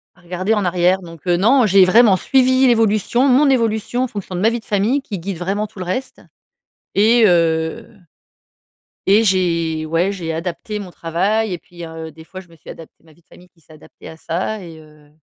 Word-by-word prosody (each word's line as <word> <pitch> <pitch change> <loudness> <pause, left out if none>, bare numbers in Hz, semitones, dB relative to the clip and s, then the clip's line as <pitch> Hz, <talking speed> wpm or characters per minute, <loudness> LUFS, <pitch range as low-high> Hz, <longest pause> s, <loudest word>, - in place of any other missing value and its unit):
à 180 - -24
regarder 180 +4 -2
en 210 -3 0
arrière. 180 +1 +1
Donc, 165 -2 -13
heu, 175 -1 +2
non, 235 +7 +4
j'ai 195 -2 +5
vraiment 210 +1 +5
suivi 260 +3 +3
l'évolution 225 +2 +2
mon 275 +2 +4
évolution 230 -1 0
en - - -1
fonction 200 -5 -7
de 180 - -3
ma 220 - +4
vie 235 +1 -3
de 220 - -21
famille, 215 +7 0
qui 215 -7 -6
guide 185 +1 -5
vraiment 195 +5 -2
tout 200 - -15
le 185 - -5
reste 220 +9 -5 0.7
et 225 +3 +4
heu 165 +3 +1 1.2
et 205 +3 +5
j'ai 170 -5 0
ouais, 165 +5 0
j'ai 170 -5 -5
adapté 180 +6 -5
mon 195 -3 -8
travail, 190 +6 -1
et 175 - -5
puis, 175 0 -11
heu, 160 0 -8
des 160 +1 -15
fois, 185 +3 -11
je 190 - -14
me 165 - -18
suis 160 - -12
adaptée 165 -2 -15
ma 160 -1 -21
vie 170 - -27
de - - -46
famille 180 0 -19
qui 165 - -32
s'est 155 +1 -19
adaptée 155 - -16
à 160 - -12
ça 190 +6 -4
et, 165 -2 -11
heu, 150 -1 -20
185 Hz, 215 wpm, -18 LUFS, 165-220 Hz, 1.2 s, j'ai